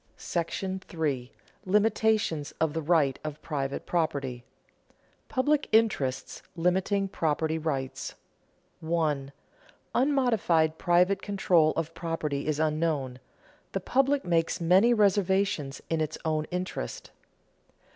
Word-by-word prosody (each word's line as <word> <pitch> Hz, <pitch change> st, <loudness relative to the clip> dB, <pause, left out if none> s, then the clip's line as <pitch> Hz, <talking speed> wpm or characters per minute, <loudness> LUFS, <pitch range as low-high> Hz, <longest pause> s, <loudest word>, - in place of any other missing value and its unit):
§ 185 Hz, +1 st, -4 dB
III. 135 Hz, -5 st, -1 dB, 0.3 s
LIMITATIONS 210 Hz, -6 st, +1 dB
OF 160 Hz, -2 st, +1 dB
THE 160 Hz, -, -2 dB
RIGHT 150 Hz, -4 st, +2 dB
OF 150 Hz, -1 st, -5 dB
PRIVATE 140 Hz, -3 st, -3 dB
PROPERTY 140 Hz, -7 st, -1 dB
[Sidenote: 120 Hz, -, -30 dB
Public 290 Hz, +3 st, +1 dB
interests 205 Hz, -, +1 dB
limiting 190 Hz, +3 st, +1 dB
property 160 Hz, -2 st, -1 dB
rights] 135 Hz, -5 st, -3 dB, 0.6 s
1. 155 Hz, -4 st, -1 dB, 0.6 s
_Unmodified 225 Hz, -, +2 dB
private 180 Hz, +2 st, +3 dB
control 180 Hz, -6 st, +3 dB
of 165 Hz, 0 st, -2 dB
property 155 Hz, -5 st, -3 dB
is 155 Hz, -1 st, 0 dB
unknown: 155 Hz, -5 st, 0 dB, 0.5 s
the -, -, 0 dB
public 275 Hz, +2 st, +1 dB
makes 170 Hz, 0 st, +1 dB
many 185 Hz, +7 st, +5 dB
reservations 195 Hz, -8 st, +1 dB
in 165 Hz, -1 st, 0 dB
its 155 Hz, 0 st, -2 dB
own 155 Hz, -1 st, 0 dB
interest. 180 Hz, -, -5 dB
165 Hz, 105 wpm, -28 LUFS, 150-195 Hz, 0.6 s, many